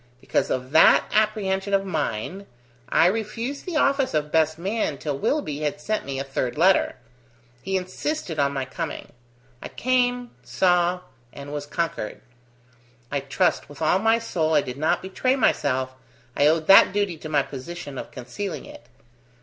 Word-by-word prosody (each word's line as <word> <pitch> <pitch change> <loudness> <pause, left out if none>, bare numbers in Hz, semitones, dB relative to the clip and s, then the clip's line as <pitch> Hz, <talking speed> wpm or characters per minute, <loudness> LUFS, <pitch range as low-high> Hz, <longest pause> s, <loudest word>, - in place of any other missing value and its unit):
Because - - -1
of 130 +1 -3
that 160 +1 +6
apprehension 200 -2 +1
of 195 0 0
mine, 160 - -3 0.4
I - - +4
refused 225 - -2
the 355 - -3
office 275 - +2
of 150 0 -1
best 160 -1 +2
man 190 -4 -2
till 145 0 -3
Willoughby 150 - -1
had 150 -1 -2
sent 215 +8 -2
me 140 -1 -4
a - - -1
third 135 -1 -3
letter. 185 +4 +4 0.7
He 190 0 -1
insisted 185 - -4
on 140 -1 +2
my 135 -2 -3
coming. 130 - -6 0.5
I - - -6
came, 245 -1 0
saw, 180 -1 +1 0.3
and 140 +1 -9
was 145 0 -5
conquered. 165 -9 -3 0.9
I 140 - 0
trust 135 0 0
with 145 - -12
all 160 +4 +2
my 225 +2 +3
soul 160 -9 -1
I 150 - +5
did 125 -1 -7
not 155 +4 +1
betray 255 +7 0
myself, 130 - +1 0.4
I 145 - +4
owed 160 +1 +2
that 195 0 +7
duty 205 -4 0
to 155 - -7
my 145 -2 +2
position 145 +1 -7
of - - -7
concealing 135 +11 -6
it. 295 0 -13
170 Hz, 165 wpm, -24 LUFS, 145-210 Hz, 0.9 s, that